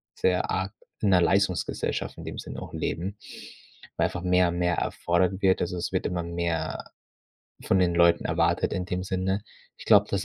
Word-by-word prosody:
sehr 90 -1 +1
arg 95 +1 -1 0.3
in 105 - +2
'ner 95 -2 +6
Leistungsgesellschaft 95 0 0
in - - -8
dem - - -6
Sinne - - -7
auch - - -9
leben, 95 +5 -3 0.8
weil - - +3
einfach 90 - -3
mehr, 90 -1 +3
mehr 90 0 +1
erfordert 90 +2 0
wird. 95 -2 +4
Also, 90 +1 -1
es 85 - -3
wird 95 - -1
immer 85 -1 -1
mehr 85 -1 -2 0.8
von 95 - +2
den 90 -2 +2
Leuten 85 0 +4
erwartet, - - +1
in 90 - -1
dem 90 0 -3
Sinne. 95 +1 -1 0.3
Ich - - -12
glaube, 105 -1 +6
das 100 - 0
90 Hz, 180 wpm, -27 LUFS, 85-95 Hz, 0.8 s, ner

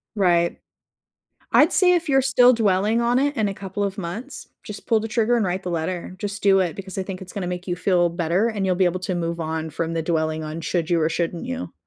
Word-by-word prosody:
Right. 175 -4 +2 1.0
I'd - - +5
say 360 -1 +4
if 345 -1 -1
you're 270 -1 +4
still 250 -1 +5
dwelling 215 0 +2
on 240 +1 +2
it 285 +2 0
in 215 -2 +1
a 195 - -4
couple 195 +1 -5
of 200 0 -2
months, 200 +10 -6 0.2
just 210 - -9
pull 225 -1 +3
the 225 - -4
trigger 230 +1 +2
and 230 - +1
write 185 +1 -2
the 180 - -3
letter. 170 +2 -3
Just 200 0 -5
do 195 -1 +5
it 175 -4 -1
because 190 -1 -8
I 190 - -1
think 185 -1 -7
it's 185 -1 -10
gonna 195 -3 -4
make 180 0 -5
you 175 - -1
feel 180 -1 +2
better 170 +5 0
and 210 -4 -2
you'll 185 -1 +1
be 190 - +3
able 180 +1 0
to 185 0 -3
move 170 -1 -3
on 160 0 -3
from 165 +2 -3
the 165 - -1
dwelling 160 -1 -1
on 155 +2 -5
should 170 0 -2
you 170 -1 +3
or 155 - +2
shouldn't 170 +1 -2
you. 255 0 -5
185 Hz, 255 wpm, -23 LUFS, 170-215 Hz, 1.0 s, I'd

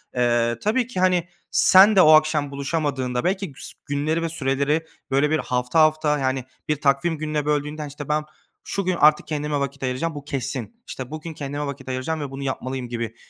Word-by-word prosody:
Eee, 120 -1 +2
tabii 230 +3 +1
ki 215 -7 -5
hani 180 -2 +2 0.2
sen 195 +3 +7
de 190 - +7
o 155 -2 +7
akşam 155 -2 +4
buluşamadığında 140 -3 -2
belki 190 -2 -1
güs 135 - -7
günleri 150 +3 -1
ve 165 - -1
süreleri 145 +1 0 0.3
böyle 140 +2 +3
bir 155 +1 +1
hafta 125 +4 0
hafta, 155 -1 +3
yani, 130 -1 -1 0.2
bir 150 -1 -1
takvim 140 +4 +2
gününe 150 -1 -2
böldüğünde 150 +1 -1
işte 145 0 -9
ben 150 0 +1 0.4
şu 200 - -3
gün 185 0 +1
artık 150 -2 +4
kendime 150 -1 -2
vakit 140 0 -4
ayıracağım 135 +6 -2
bu 145 - -7
kesin. 135 - -4
İşte 130 +1 -7
bugün 155 +1 -6
kendime 145 0 -4
vakit 140 -2 -7
ayıracağım 130 +5 -2
ve 140 -2 -5
bunu 135 +1 -6
yapmalıyım 130 -1 -4
gibi 115 -2 -4
145 Hz, 190 wpm, -23 LUFS, 135-155 Hz, 0.4 s, sen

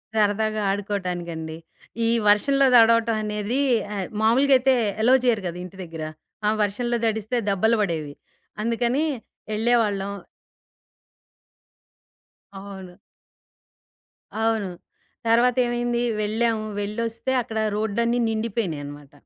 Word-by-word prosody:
సరదాగా 215 0 +1
ఆడుకోటానికండి. 175 -5 -4 0.5
ఈ - - +2 0.2
వర్షంలో 275 +6 +4
దడవటం 230 0 +5
అనేది 210 +5 -2 0.4
ఆహ్, 190 -2 -3
మామూలుగా 265 +5 +4
అయితే 260 +1 +3 0.3
ఎలో 250 +3 +5
చెయ్యరు 225 -5 +2
గదా! 175 +1 -5
ఇంటి 185 +2 -12
దగ్గెర. 165 -2 -6 0.4
ఆ - - +5
వర్షంలో 240 +4 -1
దడిస్తే 220 +2 -1
దెబ్బలు 220 +4 +2
బడేవి. 160 -6 -2 0.5
అందుకని 240 +5 +1 0.5
ఎళ్ళేవాళ్ళం. 210 -4 +1 2.5
అవును. 190 -2 -10 1.5
అవును. 220 -4 +1 0.6
తర్వాతేమైంది 240 0 +2 0.2
వెళ్ళాము. 220 +1 0 0.2
వెళ్లొస్తే 230 +4 -3
అక్కడ 225 -2 -6 0.2
రోడ్‌లన్ని 235 +3 0
నిండిపోయినియనమాట. 165 -11 -4
220 Hz, 90 wpm, -24 LUFS, 195-235 Hz, 2.5 s, దడవటం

